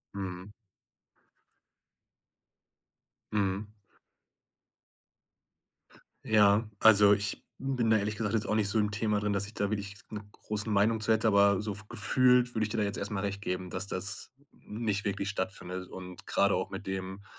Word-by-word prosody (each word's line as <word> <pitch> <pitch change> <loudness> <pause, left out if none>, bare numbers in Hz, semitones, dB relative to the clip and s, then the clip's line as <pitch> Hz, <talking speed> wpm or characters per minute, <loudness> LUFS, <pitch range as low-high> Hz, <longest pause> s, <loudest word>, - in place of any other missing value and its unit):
Mhm. 95 0 -6 2.8
Mhm. 100 0 -1 2.5
Ja, 105 0 +4
also 105 -2 +7
ich 100 0 -1
bin 130 -4 -1
da 110 - +5
ehrlich 105 +1 -1
gesagt 105 0 -2
jetzt 110 -2 0
auch 110 - +1
nicht 105 -2 +1
so 110 - +1
im 105 -1 +1
Thema 105 0 0
drin, 105 0 -1
dass 100 0 0
ich 105 - -11
da 100 -2 -1
wirklich 100 -1 -3
'ne 105 -1 -6
große 105 +1 -4
Meinung 110 +2 +2
zu 110 - +2
hätte, 110 0 +3
aber 100 -2 +4
so 105 -1 -3
f 100 +1 -6
gefühlt 125 -2 +3
würde 110 - +1
ich 110 - -1
dir 110 - -3
da 105 - +2
jetzt 100 0 -2
erst 100 - -4
mal 105 - -2
recht 100 0 -3
geben, 90 -2 -3
dass 95 +2 -3
das 95 0 -3 0.2
nicht 105 -2 -3
wirklich 100 0 -2
stattfindet 95 -2 -4
und 90 +1 -10
gerade 100 0 +2
auch 95 - -2
mit 95 +1 -8
dem, 95 +1 -5
100 Hz, 165 wpm, -30 LUFS, 100-110 Hz, 2.8 s, also